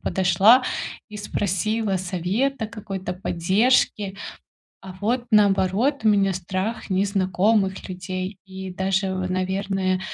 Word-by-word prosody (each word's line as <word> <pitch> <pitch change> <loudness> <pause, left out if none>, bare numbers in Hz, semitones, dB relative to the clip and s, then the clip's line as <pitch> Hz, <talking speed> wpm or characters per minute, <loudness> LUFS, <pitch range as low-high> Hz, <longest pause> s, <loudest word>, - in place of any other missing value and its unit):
подошла 195 +7 +4 0.5
и 210 - -7
спросила 205 +1 -1
совета, 195 +8 -1
какой-то 195 -4 -6
поддержки. 195 +3 +1 0.7
А 190 -1 -9
вот, 240 +3 0
наоборот, 210 +5 +3
у - - +5
меня 200 -2 +3
страх 185 +5 -3
незнакомых 190 +1 +1
людей 185 +1 -5
и 190 -1 -7
даже, 190 +1 0
в 185 0 -3
наверное, 185 0 -1
195 Hz, 105 wpm, -23 LUFS, 185-210 Hz, 0.7 s, у